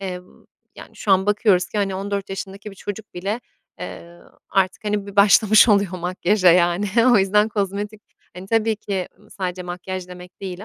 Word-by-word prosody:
eee, 185 Hz, -2 st, -5 dB, 0.5 s
yani, -, -, -13 dB
şu 205 Hz, -, -3 dB
an 190 Hz, +1 st, +3 dB
bakıyoruz 205 Hz, -3 st, +2 dB
ki, 210 Hz, -, -4 dB
hani, 195 Hz, -2 st, -1 dB
14 200 Hz, +1 st, -4 dB
yaşındaki 195 Hz, +2 st, -7 dB
bir 195 Hz, -, -15 dB
çocuk 205 Hz, +2 st, -8 dB
bile, 200 Hz, +7 st, -3 dB, 0.4 s
eee, 170 Hz, 0 st, -9 dB, 0.3 s
artık, 195 Hz, +1 st, 0 dB
hani, 205 Hz, -1 st, -2 dB
bir 200 Hz, 0 st, -11 dB
başlamış 210 Hz, +3 st, +6 dB
oluyor 200 Hz, -3 st, +3 dB
makyaja, 180 Hz, +2 st, +2 dB
yani. 175 Hz, +3 st, +2 dB, 0.3 s
O -, -, +6 dB
yüzden 210 Hz, +3 st, +3 dB
kozmetik 205 Hz, +1 st, -3 dB, 0.3 s
hani, 185 Hz, +1 st, -9 dB
tabii 225 Hz, 0 st, +1 dB
ki, 195 Hz, -3 st, -4 dB
ımm, -, -, -23 dB
sadece 180 Hz, -1 st, -4 dB
makyaj 180 Hz, +1 st, -6 dB
demek 180 Hz, +1 st, -12 dB
değil 190 Hz, +1 st, -6 dB
195 Hz, 175 wpm, -21 LUFS, 185-205 Hz, 0.5 s, başlamış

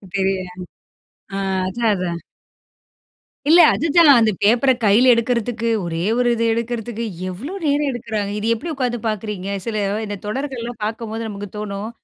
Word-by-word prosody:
தெரியல. 190 Hz, -1 st, 0 dB, 0.9 s
ஆ, -, -, -2 dB, 0.3 s
அதான், 230 Hz, +3 st, 0 dB
அதான். 175 Hz, -2 st, -3 dB, 1.3 s
இல்ல 335 Hz, +3 st, +7 dB
அதுதான் 330 Hz, 0 st, +4 dB
அந்த 220 Hz, -1 st, +3 dB
பேப்பர 240 Hz, +5 st, +4 dB
கையில 240 Hz, +5 st, +6 dB
எடுக்கிறதுக்கு, 235 Hz, 0 st, -1 dB, 0.2 s
ஒரே 165 Hz, -1 st, -3 dB, 0.2 s
ஒரு 245 Hz, -1 st, +3 dB
இத 230 Hz, -, -3 dB
எடுக்கிறதுக்கு, 235 Hz, 0 st, -3 dB, 0.3 s
எவ்வளோ 250 Hz, -, -6 dB
நேரம் 290 Hz, 0 st, +1 dB
எடுக்கிறாங்க. 220 Hz, -4 st, -3 dB
இது 215 Hz, -, -2 dB
எப்டி 230 Hz, +9 st, -5 dB
உட்கார்ந்து 250 Hz, -4 st, -2 dB
பார்க்கிறீங்க. 205 Hz, -2 st, -4 dB, 0.2 s
சில 220 Hz, -2 st, -2 dB, 0.3 s
இந்த 205 Hz, 0 st, -4 dB
தொடர்கள்லாம் 240 Hz, 0 st, -4 dB
பார்க்கும்போது 225 Hz, 0 st, -4 dB
நமக்கு 205 Hz, -1 st, -6 dB
தோணும். 210 Hz, 0 st, -4 dB
225 Hz, 135 wpm, -20 LUFS, 205-245 Hz, 1.3 s, இல்ல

